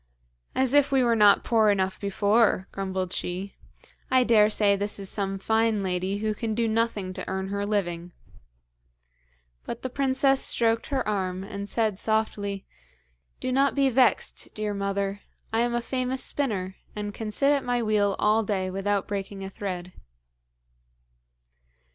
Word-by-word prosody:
'As 260 0 +1
if 290 -1 +4
we 265 -2 +4
were 235 -1 +3
not 210 -2 +5
poor 220 -2 +3
enough 190 -2 0
before,' 200 0 +2
grumbled 190 -2 -3
she. 185 +3 -3 0.6
'I 255 -1 +4
dare 215 -3 +5
say 205 -1 +3
this 205 +1 -3
is 195 -1 -5
some 195 -1 -2
fine 220 +1 +1
lady 185 +1 -1
who 215 +1 -1
can 220 0 -3
do 230 0 +1
nothing 220 -4 -1
to 185 - -6
earn 190 0 -3
her 200 0 -2
living.' 175 -4 -2 1.5
But 235 - -6
the 260 - -3
princess 270 0 +2
stroked 230 0 +1
her 270 -5 -1
arm, 190 -3 -2
and 200 0 -6
said 215 -4 0
softly: 205 -3 -1 0.7
'Do - - -2
not 275 +2 +2
be 275 -1 +3
vexed, 250 0 +1
dear 210 -1 -2
mother; 200 0 -2 0.3
I 225 - +2
am 240 0 +1
a 240 - 0
famous 255 +1 -1
spinner, 195 -9 -2 0.2
and 205 -1 -4
can 220 0 -5
sit 275 +7 +2
at 280 -2 +1
my 245 -1 0
wheel 205 -2 +2
all 215 +1 +3
day 190 -3 -2
without 195 +1 -1
breaking 195 -1 -5
a 195 - -6
thread.' 180 -3 -5
210 Hz, 160 wpm, -26 LUFS, 195-230 Hz, 1.5 s, not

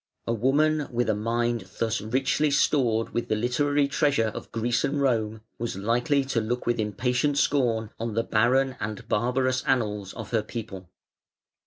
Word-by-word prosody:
A 115 - 0
woman 145 +6 +2
with 120 -3 0
a - - +1
mind 115 -1 -1
thus 115 0 0
richly 130 +7 +1
stored 125 -6 +2
with 120 - -1
the - - +1
literary 140 +5 +1
treasure 140 -6 +1
of - - -8
Greece 120 +1 0
and 145 +1 0
Rome 110 -5 0 0.2
was 120 -3 -3
likely 120 +7 +1
to 130 -4 0
look 120 +3 -2
with 120 -1 0
impatient 125 +7 0
scorn 115 -7 +1
on 115 -1 -3
the 115 - +1
barren 125 +4 +2
and 105 -1 -5
barbarous 130 +3 +1
annals 105 -8 0
of - - -7
her 115 -2 +2
people. 105 -5 -7
120 Hz, 165 wpm, -26 LUFS, 110-135 Hz, 0.2 s, woman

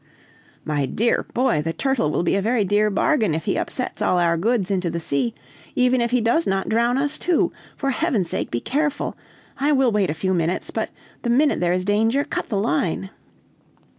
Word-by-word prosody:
"My 145 -3 0
dear 230 - 0
boy, 245 - +2
the 165 +2 -2
turtle 265 - 0
will 155 - 0
be 175 - +1
a 200 - +1
very 225 0 +1
dear 210 +2 +2
bargain, 215 - +1
if 160 0 -4
he - - 0
upsets 250 -4 -3
all 185 -3 +2
our 170 -1 +3
goods 205 +2 0
into 185 -3 0
the 170 +1 -3
sea, 165 +9 -1 0.4
even 250 0 +3
if 235 - +1
he 250 0 +2
does 235 +9 +2
not 195 0 0
drown 235 +3 +2
us 290 +2 -1
too. 355 -2 +2 0.3
For 275 -1 0
Heaven's 250 - 0
sake - - -2
be 120 - -2
careful! 295 +2 -1 0.4
I 285 +2 +2
will 265 -3 +3
wait 205 -3 +1
a 150 - -2
few 185 +4 -1
minutes, 170 0 -1
but - - -2 0.3
the 240 - -2
minute 285 +5 +3
there 175 -1 +1
is 180 0 0
danger, 225 +7 +2
cut - - -4
the 210 - -1
line." 185 +1 -1
215 Hz, 205 wpm, -22 LUFS, 175-255 Hz, 0.4 s, our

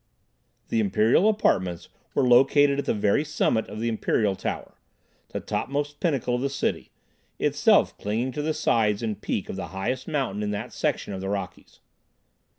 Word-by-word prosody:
The 230 - +1
imperial 195 - +3
apartments 95 - 0 0.3
were 130 - +3
located 140 +3 +5
at - - -2
the - - +1
very 105 +7 +2
summit 145 -6 0
of 105 - -7
the 115 - -1
Imperial 110 -2 +1
Tower, - - -5 0.5
the - - -5
topmost 145 +1 -3
pinnacle 140 -8 0
of 125 - 0
the 140 - 0
city, 140 - -2 0.5
itself - - +3
clinging 115 +5 -1
to 150 - -4
the 155 +1 -1
sides 105 -1 +1
and 110 -2 -3
peak - - -2
of - - -6
the - - -4
highest 125 +7 -2
mountain 130 -10 -1
in 105 - -1
that 105 -1 -4
section - - -2
of 95 - -5
the 95 - -3
Rockies. 100 -1 -6
120 Hz, 170 wpm, -25 LUFS, 105-145 Hz, 0.5 s, located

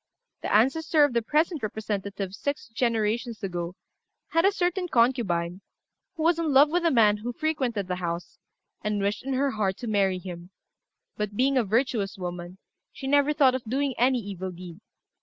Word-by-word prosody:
The - - -3
ancestor 300 +7 +3
of 290 -3 +2
the 235 - +2
present 305 +6 +1
representative, 200 -2 -4
six 285 +5 -4
generations 230 0 -1
ago, 175 -2 -4 0.5
had 330 +2 +2
a 395 - +5
certain 360 -1 -1
concubine, 210 - +1 0.5
who 320 - -3
was 335 0 +3
in 325 -3 0
love 280 +2 +6
with 350 +1 +1
a 335 - +4
man 215 -6 +4
who 235 +4 -4
frequented 245 -8 -1
the 180 -1 -2
house, 170 -1 -5 0.4
and 210 -1 -1
wished 200 +3 -1
in 270 +1 -2
her 275 +1 +1
heart 200 -4 -1
to 240 - -6
marry 195 -3 +2
him; 175 -1 -8 0.7
but, 210 -1 -3
being 270 +2 +3
a 255 - +3
virtuous 220 -2 0
woman, 175 0 -6 0.3
she 270 - -9
never 285 +2 +3
thought 280 -4 +4
of 260 -1 -3
doing 270 +4 0
any 255 +2 +4
evil 195 -4 -5
deed. 175 -1 -10
230 Hz, 175 wpm, -26 LUFS, 195-275 Hz, 0.7 s, love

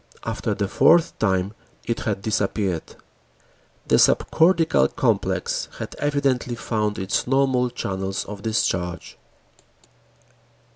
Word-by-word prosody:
After - - -2
the 100 -1 -1
fourth 165 - +3
time, 95 -1 0 0.3
it 115 +1 -2
had 100 -4 -3
disappeared. 100 -5 -1 0.9
The - - +4
subcortical 165 - +3
complex - - 0
had - - -6
evidently 140 -4 0
found 105 -3 -2
its 95 +4 -1
normal 130 -1 +2
channels 95 -3 -3
of 100 -1 -8
discharge. 90 -6 -2
110 Hz, 100 wpm, -23 LUFS, 95-130 Hz, 0.9 s, The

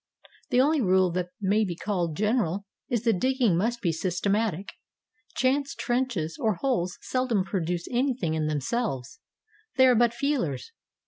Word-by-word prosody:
The 250 -3 +3
only 295 +2 +3
rule 185 -3 +3
that 180 0 -2
may 205 +2 +2
be 180 -4 -3
called 175 -5 -2
general 205 -3 0 0.2
is 240 -4 0
that 225 -6 +2
digging 255 -6 +2
must 230 +7 0
be 170 - +2
systematic; 195 +3 -1 0.7
chance 275 +2 +1
trenches 240 -11 -1
or 220 -3 +2
holes 185 -4 -1
seldom 255 -6 0
produce 175 -3 -2
anything 245 - 0
in 155 -1 0
themselves, 155 - -2 0.3
— 435 0 -35
they 260 - +7
are 255 - +6
but 235 0 +3
feelers. 240 - -1
210 Hz, 150 wpm, -27 LUFS, 175-255 Hz, 0.7 s, they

